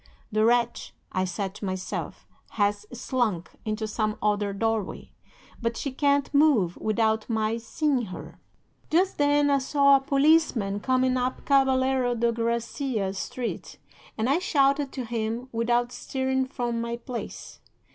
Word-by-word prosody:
The 215 0 +2
wretch, 235 +1 +1 0.2
I 185 0 0
said 190 +1 -3
to 210 - -7
myself, 185 -1 -4 0.3
has 205 0 +1
slunk 235 -7 -1
into 215 0 -2
some 215 0 -1
other 205 -1 +1
doorway. 220 0 -2 0.5
But 230 0 -1
she 275 - -3
can't 280 +1 +1
move 280 - +4
without 220 0 0
my 220 0 0
seeing 260 +2 0
her. 185 -3 -9 0.5
"'Just 365 +3 +2
then 290 0 +3
I 280 - +4
saw 280 +1 +4
a - - -5
policeman 275 -8 +2
coming 255 +2 +1
up 255 +1 -2
Caballero 265 -2 +3
de 235 0 +1
Gracia 235 -2 -2
Street, 235 +5 -5 0.4
and 220 +1 0
I 280 +6 +3
shouted 280 -5 +2
to 255 -3 -4
him 230 +2 -3
without 240 +1 +1
stirring 265 +1 -1
from 240 -3 -2
my 235 0 -3
place. 240 0 -7
240 Hz, 140 wpm, -26 LUFS, 220-270 Hz, 0.5 s, move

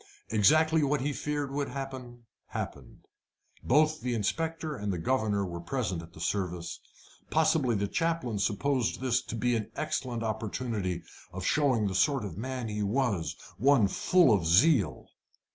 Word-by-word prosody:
Exactly 155 +10 +4
what 145 -1 +1
he 145 +2 -1
feared 145 -1 -3
would 140 0 -2
happen, 130 -3 -7 0.2
happened. - - -7 0.6
Both 155 +4 +3
the 125 -1 -1
inspector 160 +8 -2
and 105 -4 -3
the 90 - -2
governor 105 +1 0
were 85 -2 -5
present 100 -5 -2
at 85 0 -13
the - - -13
service. 90 -1 -2 0.5
Possibly 155 -6 +2
the 100 0 0
chaplain 165 -7 -1
supposed 115 +5 0
this 130 -1 +1
to - - -7
be 120 +1 +1
an 110 -2 -3
excellent 125 -6 -2
opportunity 110 -5 -3 0.3
of 95 0 -6
showing 130 -6 +2
the 100 - -1
sort 135 +4 +2
of 90 -6 -6
man 125 +2 -4
he 105 -1 -3
was 105 -4 0 0.2
one 130 -3 +5
full 170 - +4
of 90 -6 +1
zeal. 100 - +4
120 Hz, 155 wpm, -29 LUFS, 100-140 Hz, 0.6 s, one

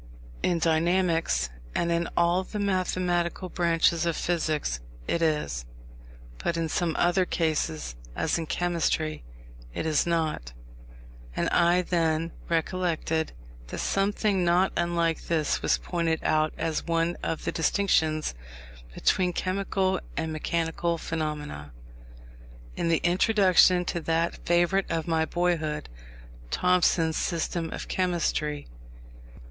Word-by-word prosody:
In 175 - +1
dynamics, 165 - +1 0.2
and 170 0 +1
in 170 0 0
all 175 +2 +3
the 210 - -7
mathematical 185 -2 0
branches 170 -1 +2
of 165 - 0
physics, 155 - -1 0.3
it 170 - 0
is; 150 - 0 0.8
but 170 - -1
in 165 -1 -1
some 170 -1 0
other 175 +2 +3
cases, 145 - -1 0.2
as 160 - 0
in 165 - -4
chemistry, 165 - 0 0.5
it - - -2
is 155 +1 +2
not; 155 - -1 0.8
and - - 0
I 175 +1 +3
then 165 -2 0 0.2
recollected 165 -1 0 0.3
that - - -6
something 195 -1 +1
not 175 +2 +3
unlike 170 -1 0
this 160 -3 0
was - - +2
pointed 165 -2 -1
out 155 0 +2
as 160 -2 -1
one 165 +1 +1
of 160 - -3
the - - 0
distinctions 160 - +1 0.6
between 180 -1 +2
chemical 190 0 0 0.2
and 160 -1 -2
mechanical 165 +1 -1
phenomena, 150 - -4 1.0
in - - -1
the 165 - +2
introduction 185 -1 +4
to 175 - -2
that 165 +1 -1
favourite 175 +3 +2
of 165 -1 -2
my 160 -1 +2
boyhood, 160 -3 -1 0.6
Thompson's 175 - +2
System 165 -1 -2
of - - -6
Chemistry. 165 -5 -1
170 Hz, 120 wpm, -27 LUFS, 160-180 Hz, 1.0 s, introduction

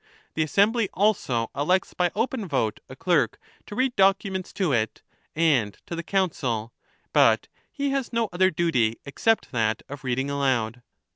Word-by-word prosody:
The 160 - -1
Assembly 205 +7 +2
also 155 - +1
elects 180 +7 +1
by 180 -1 +1
open 225 -1 -1
vote 120 -9 -1
a - - -9
clerk - - +1 0.3
to 205 - -7
read 255 +1 +1
documents 195 -1 +2
to 185 -6 0
it 110 -4 -1 0.3
and 140 -11 +2
to 170 - -5
the 170 - -3
Council; 135 - -1 0.4
but - - +4 0.2
he 280 -1 -2
has 275 -2 -2
no 230 -1 +1
other 185 +1 +4
duty 130 -11 +1
except 225 +10 0
that 110 -3 0
of 145 +1 -9
reading 130 +1 -1
aloud. 125 -5 0
165 Hz, 155 wpm, -25 LUFS, 125-200 Hz, 0.4 s, but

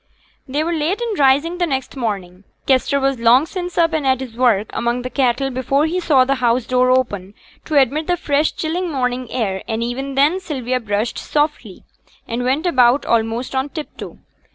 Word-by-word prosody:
They 285 +4 -1
were 340 +2 -1
late 330 +6 -1
in 460 -6 -3
rising 290 +6 +3
the 350 - +1
next 265 -2 -3
morning. 195 -7 -4 0.2
Kester 270 +1 +2
was 270 -2 0
long 240 +5 +5
since 355 0 -6
up 330 -1 +3
and 315 -2 0
at 260 -1 +2
his 255 -4 -7
work 230 -4 +2
among 240 +1 -1
the 255 - -5
cattle 270 0 +1
before 260 +3 +1
he 345 +3 -1
saw 280 -7 +3
the 270 - +1
house 240 0 +2
door 255 0 +2
open 210 -7 0 0.3
to 310 - 0
admit 280 +4 +1
the 355 - +1
fresh 295 -1 +1
chill 325 +3 -2
morning 250 -5 -2
air; 195 -6 -2
and 225 0 -2
even 265 +3 -4
then 295 +7 +3
Sylvia 255 -8 -3
brushed 215 0 -2
softly, 295 - -2 0.4
and 235 +1 -3
went 270 +6 0
about 255 -5 +3
almost 230 +2 0
on 265 +2 -1
tip 310 0 -7
toe. - - -9
265 Hz, 195 wpm, -19 LUFS, 240-300 Hz, 0.4 s, long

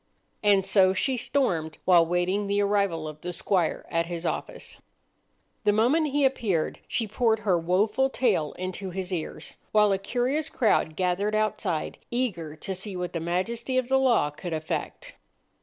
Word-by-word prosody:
And 200 -2 +4
so 190 -1 +4
she 265 +7 +1
stormed 210 - -1
while 180 -2 +6
awaiting 180 +4 0
the 200 0 +1
arrival 200 -6 +1
of 155 0 -9
the 180 - -4
squire 180 -1 0
at 165 0 0
his 170 0 -5
office. - - -4 0.8
The 210 - +4
moment 250 +10 +3
he 285 0 +3
appeared 215 -11 0
she 225 - -1
poured 220 +1 +1
her 200 -4 +2
woful 200 +10 +1
tale 210 - +1
into 185 +1 -5
his 185 0 -4
ears, 165 -3 -5
while 210 -1 +4
a 195 - +1
curious 255 +8 -1
crowd 190 -9 +1
gathered 190 +4 0
outside, 215 -7 -1
eager 185 -11 -2
to 190 +5 -4
see 190 +1 -6
what 180 -1 -4
the 170 - -2
majesty 190 +10 -2
of 255 -1 0
the 265 0 +4
law 235 - +3
could 165 +4 -6
effect. 155 0 -4
195 Hz, 165 wpm, -26 LUFS, 175-225 Hz, 0.8 s, while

